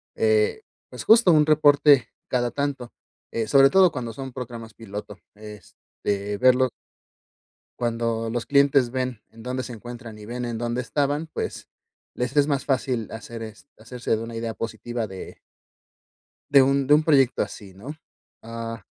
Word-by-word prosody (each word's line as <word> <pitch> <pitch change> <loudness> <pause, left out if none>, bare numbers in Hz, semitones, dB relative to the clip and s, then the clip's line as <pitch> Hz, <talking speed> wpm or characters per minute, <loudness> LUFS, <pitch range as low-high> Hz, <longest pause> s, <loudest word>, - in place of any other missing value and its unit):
eh, 445 -1 +2 0.3
pues - - -8
justo 220 -5 +6
un 150 -1 +5
reporte 145 -4 +5 0.2
cada 120 -1 0
tanto. 135 -2 -3 0.4
Eh, 115 -2 -2
sobre 135 +4 +6
todo 190 -2 +5
cuando 120 -5 -5
son 135 +1 -7
programas 115 -3 -8
piloto. 105 -2 -8 0.2
Este, 105 0 -6
verlo 130 +1 +4 1.1
cuando 115 -1 -1
los 120 0 -3
clientes 140 -3 +4
ven 125 -3 -3
en 115 0 -14
dónde 130 +1 -3
se 125 - -7
encuentran 120 0 -9
y 105 - -11
ven 125 +2 -4
en 115 -2 -4
dónde 120 +1 -2
estaban, 145 +4 -1
pues 160 - -6 0.5
les 125 +4 -3
es 145 0 +5
más 140 -2 -1
fácil 130 -5 -1
hacer 115 +1 -8
est 110 +5 -10
hacerse 115 +1 -3
de 110 - -5
una 115 0 -7
idea 115 0 -3
positiva 115 0 -4
de 95 -1 -9 1.1
de 140 -2 +7
un 135 0 +2
de 145 - +6
un 150 - +4
proyecto 135 -5 +3
así 95 -3 -8
¿no? 130 +10 -8 0.5
Ah 115 -1 -6
125 Hz, 160 wpm, -24 LUFS, 115-140 Hz, 1.1 s, de